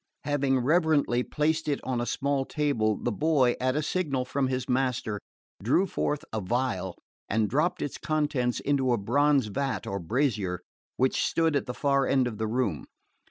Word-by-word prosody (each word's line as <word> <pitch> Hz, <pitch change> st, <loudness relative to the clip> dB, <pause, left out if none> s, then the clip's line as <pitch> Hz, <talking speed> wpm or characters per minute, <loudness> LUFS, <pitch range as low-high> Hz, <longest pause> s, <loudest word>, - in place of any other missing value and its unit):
Having 140 Hz, -3 st, +1 dB
reverently 150 Hz, -4 st, +2 dB
placed 155 Hz, +4 st, 0 dB
it 145 Hz, -2 st, 0 dB
on 125 Hz, -2 st, -1 dB
a 120 Hz, -, -2 dB
small 140 Hz, -1 st, 0 dB
table, 130 Hz, -8 st, 0 dB
the 120 Hz, -, -2 dB
boy, 135 Hz, 0 st, +3 dB
at 130 Hz, +1 st, +1 dB
a 150 Hz, -, 0 dB
signal 140 Hz, -7 st, -1 dB
from 135 Hz, +1 st, 0 dB
his 130 Hz, -1 st, -2 dB
master, 125 Hz, -5 st, 0 dB, 0.4 s
drew 130 Hz, -, +3 dB
forth 150 Hz, -5 st, -2 dB
a 110 Hz, -3 st, -2 dB
phial 105 Hz, -4 st, -1 dB, 0.3 s
and 110 Hz, 0 st, +2 dB
dropped 170 Hz, -, 0 dB
its 145 Hz, -, -5 dB
contents 145 Hz, -5 st, 0 dB
into 135 Hz, -3 st, +1 dB
a -, -, +2 dB
bronze 140 Hz, +5 st, +2 dB
vat 135 Hz, +6 st, -2 dB
or 100 Hz, -, -3 dB
brazier 105 Hz, -, -1 dB, 0.4 s
which 130 Hz, +1 st, +2 dB
stood 165 Hz, -2 st, +1 dB
at 140 Hz, -, 0 dB
the 125 Hz, -, -4 dB
far 140 Hz, -2 st, +2 dB
end 130 Hz, -2 st, +3 dB
of 115 Hz, -3 st, -4 dB
the 110 Hz, -, 0 dB
room. 110 Hz, -, -1 dB
130 Hz, 175 wpm, -27 LUFS, 120-145 Hz, 0.4 s, boy